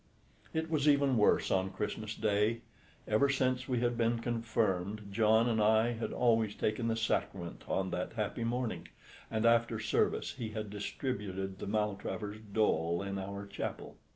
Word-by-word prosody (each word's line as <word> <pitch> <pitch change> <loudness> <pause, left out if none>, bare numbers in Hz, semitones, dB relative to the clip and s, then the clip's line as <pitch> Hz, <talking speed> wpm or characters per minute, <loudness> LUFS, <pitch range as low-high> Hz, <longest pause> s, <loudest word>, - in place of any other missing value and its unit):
It 160 0 -1
was 155 -2 +2
even 140 -2 +4
worse 105 -2 +3
on 95 0 +2
Christmas 105 +2 -4
Day. 105 +2 +1 0.5
Ever 110 +6 +3
since 130 -2 +1
we 125 -3 0
had 120 -1 0
been 115 0 +2
confirmed 110 -4 -1
John 110 +2 +4
and 110 -2 +1
I 110 +2 +4
had 115 -1 -3
always 115 -3 +2
taken 110 +2 -1
the 115 - +1
Sacrament 100 -5 -2
on 95 -1 -1
that 90 +4 -3
happy 110 +1 -2
morning, 115 -7 -2 0.4
and 110 +1 0
after 115 -1 +3
service 110 - +1
he 115 -4 -5
had 110 -1 -5
distributed 100 -3 -4
the - - -5
Maltravers 105 0 -2
dole 85 -4 +1
in 100 0 -3
our 100 +1 -5
chapel. 100 0 -5
110 Hz, 155 wpm, -33 LUFS, 100-115 Hz, 0.5 s, even